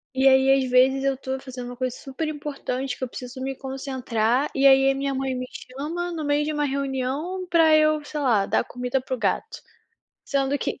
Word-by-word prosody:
e 265 +1 +5
aí, 265 0 +5
às 255 - -4
vezes, 265 +2 +4
eu 275 0 +1
estou 265 0 -4
fazendo 250 -2 -7
uma 245 - -7
coisa 255 0 -2
super 270 +5 -5
importante 275 -3 -4
que - - -6
eu - - -1
preciso 250 +1 -8
me 270 +1 -2
concentrar, 260 -2 -1
e 275 - +2
aí 270 0 +7
a 270 - +2
minha 275 0 -2
mãe 265 -1 -2
me 255 0 -3
chama 305 +7 -5
no 320 -2 -4
meio 290 0 +1
de 305 - -2
uma 295 0 0
reunião 275 +6 -2
pra 325 -2 +5
eu, 310 0 +3
sei 300 0 -4
lá, 225 -8 +3
dar - - +1
comida 250 +1 -2
para 260 - -5
o - - -1
gato. - - -1 0.7
Sendo 275 0 0
que - - -3
270 Hz, 215 wpm, -24 LUFS, 255-290 Hz, 0.7 s, aí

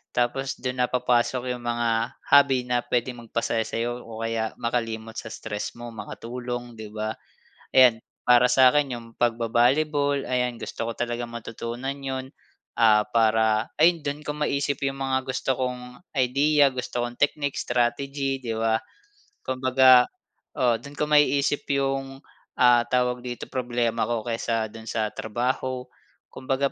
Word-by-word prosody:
Tapos 135 +2 0
dun 125 0 -3
na 125 - +3
papasok 125 0 +1
'yong 125 - -8
mga 120 0 0 0.4
hobby 140 -3 +6
na 125 0 +1
puwedeng 120 0 -2
magpasaya 115 0 -1
sa'yo 120 +1 -2
o 115 -1 -8
kaya 115 -1 -2
makalimot 115 -1 -2
sa - - -8
stress 105 -1 -5
mo, 120 0 -8
makatulong 120 +2 -6
'di 110 - -7
ba? 110 +1 -3 0.6
Ayan 125 -4 +6 0.3
para 125 0 +7
sa 130 0 +7
akin 145 -3 +1
yung 115 - -12
pag-ba-volleyball 135 +5 +2
ayan 125 -1 0
gusto 115 - -5
ko 115 - -2
talagang 120 0 -3
matutunan 120 +3 -5
yun. 130 -1 -5 0.5
Ah, 110 -2 +6
para 110 0 +2
ayun 170 +1 +5
dun 145 +1 -3
ko 150 - -2
maisip 140 -2 -1
yung 135 0 -3
mga 130 -1 -1
gusto 130 0 0
kong 125 -1 -4 0.2
idea, 140 +3 +4
gusto 125 -1 -3
kong 120 0 -7
technique, 145 -1 0
strategy 135 +3 -1
'di 115 -3 -3
ba? 110 0 +1 0.7
Kumbaga 130 -1 +5 0.5
oo 120 -2 +3
doon 140 +1 -11
ko 150 - +1
maisip 145 -1 +3
'yong, 135 -1 -1 0.4
ah, 120 -1 +6
tawag 125 -1 +1
dito 120 -1 -5
problema 120 -2 -1
ko 115 -2 -2
kesa 115 -1 -1
dun 110 0 -11
sa 110 -2 -1
trabaho. 125 +3 -2 0.5
Kumbaga 135 +1 -1
125 Hz, 145 wpm, -25 LUFS, 115-135 Hz, 0.7 s, para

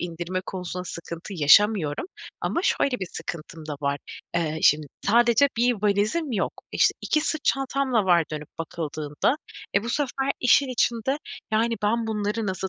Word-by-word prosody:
indirme 175 +1 -3
konusunda 180 -1 -5
sıkıntı 170 +3 -7
yaşamıyorum 170 - +4 0.3
ama 340 - -1
şöyle 275 -9 +1
bir 185 - -3
sıkıntım 160 -1 -7
da 150 - -4
var. 140 0 0 0.4
Eee, 160 -2 -1
şimdi 150 0 +4 0.2
sadece 235 +5 +5
bir 245 +1 +3
valizim 215 +9 +1
yok 200 - 0 0.2
işte, - - +4
2 305 - +1
sırt 310 -1 -2
çantam 270 -1 0
da 215 -3 +4
var 175 -3 +4
dönüp 150 0 -5
bakıldığında, 155 - -2 0.4
eee, 200 - +3
bu - - -4
sefer 275 0 0
işin 255 +2 +4
içinde 245 +2 0 0.3
yani, 230 +1 +2
"Ben 225 +2 +1
bunları 210 0 -1
nasıl 190 0 -2
205 Hz, 155 wpm, -25 LUFS, 170-245 Hz, 0.4 s, sadece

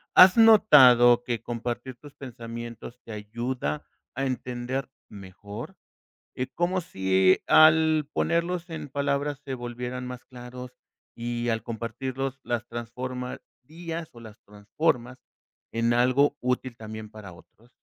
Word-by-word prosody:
¿Has 185 +3 +9
notado 125 - +7
que 120 -2 -3
compartir 120 +1 -5
tus 145 +3 -15
pensamientos 120 -1 -8
te 115 - -11
ayuda 105 - -4 0.3
a 135 +2 -1
entender 130 +1 -3 0.2
mejor? 100 +1 -10 0.6
Y 125 - -2
como 175 +5 -1
si 95 - +2
al 155 -1 +5
ponerlos 170 +1 -1
en 155 -3 -7
palabras 140 +1 -1
se 135 -1 -4
volvieran 125 +1 -5
más 125 0 -8
claros 125 0 -10 0.4
y 120 0 -3
al 115 -2 0
compartirlos 130 +4 -5
las 120 0 -3
transformarías 130 +7 -7
o 120 - -14
las 110 -2 -13
transformas 120 +4 -2 0.5
en 115 +1 +1
algo 130 +4 +3
útil 125 -1 -2
también 110 -1 -8
para 105 -4 -11
otros. 115 +7 -20
125 Hz, 120 wpm, -26 LUFS, 115-140 Hz, 0.6 s, Has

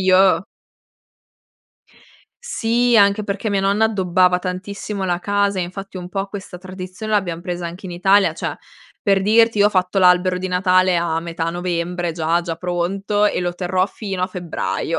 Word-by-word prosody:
Io 190 +1 +4 2.0
Sì, 240 - +1
anche 200 +1 +4
perché 205 +2 -3
mia 200 -1 +1
nonna 200 +3 +2
addobbava 185 -3 +2
tantissimo 190 +2 -5
la 175 -2 0
casa 200 +1 0
e, - - +1
infatti, 195 +2 -7
un 180 -1 -6
po' 195 +1 -3
questa 195 -2 -8
tradizione 185 +3 -7
l'abbiam 175 -5 0
presa 175 -1 -4
anche 175 +3 -8
in 180 - -6
Italia, 195 +3 +3
cioè, - - -4 0.5
per 195 -2 +2
dirti, 225 +1 +4
io 205 - +6
ho - - +4
fatto 185 0 +1
l'albero 180 0 +4
di 185 - -3
Natale 185 0 +3
a 170 -1 0
metà 165 -1 -3
novembre 175 0 -2
già 165 +1 0
già 165 -2 -4
pronto 190 +4 -1
e 205 - +1
lo 175 -1 -2
terrò 185 +1 0
fino 195 -3 -5
a - - +2
febbraio. 180 -3 -3
185 Hz, 170 wpm, -20 LUFS, 180-200 Hz, 2.0 s, io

